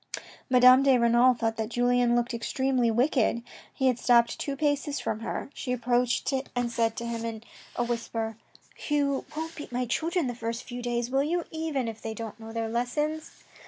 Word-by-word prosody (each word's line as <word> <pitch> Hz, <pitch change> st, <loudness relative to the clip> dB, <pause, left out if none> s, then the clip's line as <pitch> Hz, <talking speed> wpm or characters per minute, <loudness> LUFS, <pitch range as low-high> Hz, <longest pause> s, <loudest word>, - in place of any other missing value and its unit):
Madame 255 Hz, +1 st, +7 dB
de 270 Hz, -2 st, +5 dB
Renal 240 Hz, +2 st, +5 dB
thought 225 Hz, -1 st, -1 dB
that 220 Hz, -1 st, -2 dB
Julien 245 Hz, 0 st, +2 dB
looked 240 Hz, +1 st, 0 dB
extremely 250 Hz, +1 st, 0 dB
wicked. 235 Hz, -1 st, +2 dB, 0.3 s
He 265 Hz, -, -2 dB
had 250 Hz, -2 st, +3 dB
stopped 235 Hz, -1 st, +3 dB
two 280 Hz, -, -3 dB
paces 290 Hz, 0 st, 0 dB
from 215 Hz, -, -2 dB
her. 230 Hz, +4 st, -5 dB
She 250 Hz, -, -5 dB
approached 245 Hz, +2 st, +1 dB, 0.2 s
and 245 Hz, -1 st, 0 dB
said 230 Hz, -1 st, 0 dB
to 235 Hz, -, -5 dB
him 230 Hz, -1 st, -3 dB
in 225 Hz, -1 st, -5 dB, 0.3 s
a 240 Hz, -, 0 dB
whisper: 230 Hz, -2 st, -3 dB, 0.2 s
" -, -, -12 dB
You 285 Hz, -2 st, +1 dB
won't 320 Hz, +1 st, -4 dB
beat 295 Hz, -, -8 dB
my 250 Hz, +1 st, -1 dB
children 330 Hz, +7 st, 0 dB
the 245 Hz, -, -2 dB
first 230 Hz, 0 st, -4 dB
few 245 Hz, -1 st, -7 dB
days, 240 Hz, 0 st, -2 dB
will 270 Hz, +1 st, +3 dB
you, 335 Hz, +4 st, -1 dB
even 315 Hz, -6 st, -2 dB
if 225 Hz, -1 st, -6 dB
they 220 Hz, 0 st, -5 dB
do 230 Hz, -, -5 dB
not 220 Hz, 0 st, -8 dB
know 225 Hz, 0 st, -9 dB
their 225 Hz, 0 st, -2 dB
lessons 295 Hz, +7 st, -2 dB
245 Hz, 200 wpm, -27 LUFS, 230-270 Hz, 0.3 s, Madame